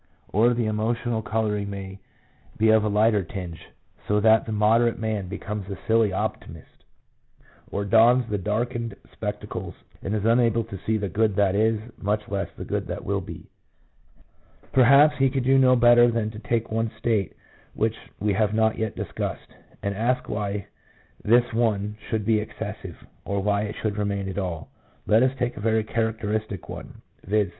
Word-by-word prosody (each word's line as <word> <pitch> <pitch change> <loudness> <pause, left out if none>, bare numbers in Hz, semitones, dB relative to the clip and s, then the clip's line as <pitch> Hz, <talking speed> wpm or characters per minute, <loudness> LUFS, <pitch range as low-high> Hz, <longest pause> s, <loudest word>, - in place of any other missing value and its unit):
Or 120 +4 +3
the 120 -1 0
emotional 110 +2 -1
colouring 105 -2 -1
may 95 -1 -7 0.6
be 110 0 +3
of 110 -1 +4
a - - 0
lighter 105 0 +3
tinge, 90 -2 -7 0.5
so 105 0 +2
that 110 +1 +4
the - - -3
moderate 115 +3 +3
man 110 -4 -2
becomes 100 +1 -5
a 100 - -5
silly 110 -2 +3
optimist, 95 - -5 0.8
or 100 - -3
dons 115 +3 +5
the 105 -2 -2
darkened 115 +4 -2 0.2
spectacles, - - -5 0.3
and 100 +3 -2
is 105 -1 -2
unable 115 0 +3
to 100 -4 -8
see 110 0 +2
the 100 -1 -2
good 105 +2 +1
that 100 -2 +3
is, 110 +2 +2 0.2
much 105 +1 -1
less 100 -1 -2
the - - -6
good - - -3
that - - -5
will - - -1
be." - - -9 1.2
1 - - -27
Perhaps 140 +3 +6
we 135 0 +4
could 135 -1 -1
do 135 +1 +4
no 130 -1 +5
better 120 0 +6
than 115 -2 -1
to 105 - -9
take 115 -1 -2
one 115 +1 0
state 110 -5 0 0.4
which 110 0 0 0.2
we 105 -1 +1
have 105 +1 +1
not 110 0 +2
yet 110 -1 -2
discussed, - - -5 0.3
and 100 - -1
ask 120 +5 0
why 105 -1 -3 0.6
this 120 +2 +3
one 105 -3 0
should 110 -2 -1
be 110 -1 +3
excessive, 105 - -7 0.3
or 100 0 -2
why 100 +1 +1
it 105 +1 -4
should 105 -2 -1
remain 100 -1 -1
at 95 +1 -3
all. 85 -5 -5 0.3
Let 110 +2 +4
us 130 +1 +2
take 125 -1 -2
a - - -6
very 110 0 +2
characteristic 110 -3 -2
one - - -9
— - - -37
viz. 105 -1 +1
110 Hz, 180 wpm, -25 LUFS, 100-115 Hz, 1.2 s, Perhaps